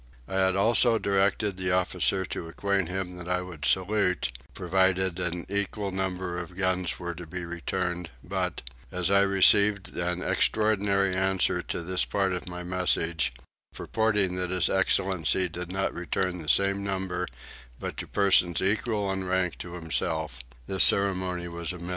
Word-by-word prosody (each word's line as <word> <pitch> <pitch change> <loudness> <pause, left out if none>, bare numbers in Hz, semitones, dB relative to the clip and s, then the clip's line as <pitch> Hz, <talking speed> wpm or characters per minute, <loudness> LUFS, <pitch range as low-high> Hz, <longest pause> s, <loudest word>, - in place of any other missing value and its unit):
I 95 - -2
had 95 0 +2
also 115 +3 +4
directed 100 0 0
the 95 0 -1
officer 95 +1 +1
to 85 - -6
acquaint 100 +1 -1
him 90 -1 -4
that 90 0 -7
I 90 0 0
would 85 -5 -8
salute, 95 -6 +1 0.2
provided 95 0 +1
an 90 -1 -2
equal 100 0 -2
number 95 -2 -3
of 90 +1 -9
guns 95 -3 -1
were 85 0 -5
to 85 0 -10
be 90 +2 -6
returned 90 0 -4
but, - - -3 0.3
as 90 +1 -1
I 100 0 +5
received 100 +1 +4
an 90 +1 -2
extraordinary 100 -3 +1
answer 95 -1 +1
to 85 - -5
this 90 +2 0
part 95 -2 -1
of 90 0 -5
my 90 0 -6
message, 85 -5 0 0.4
purporting 105 -4 +1
that 90 -1 -2
his 90 -1 +1
excellency 95 -2 +1
did 90 +1 -7
not 95 +1 -2
return 90 +1 -2
the 80 -1 -6
same 100 +3 +2
number 95 -2 -3 0.5
but - - -5
to - - -5
persons 95 -4 +3
equal 105 0 0
in 95 -1 -3
rank 90 -2 -1
to 90 -1 -8
himself, 80 -4 -2 0.3
this 95 +4 +8
ceremony 95 -3 +3
was 85 0 -4
omitted. 85 0 -8
95 Hz, 160 wpm, -27 LUFS, 90-95 Hz, 0.5 s, this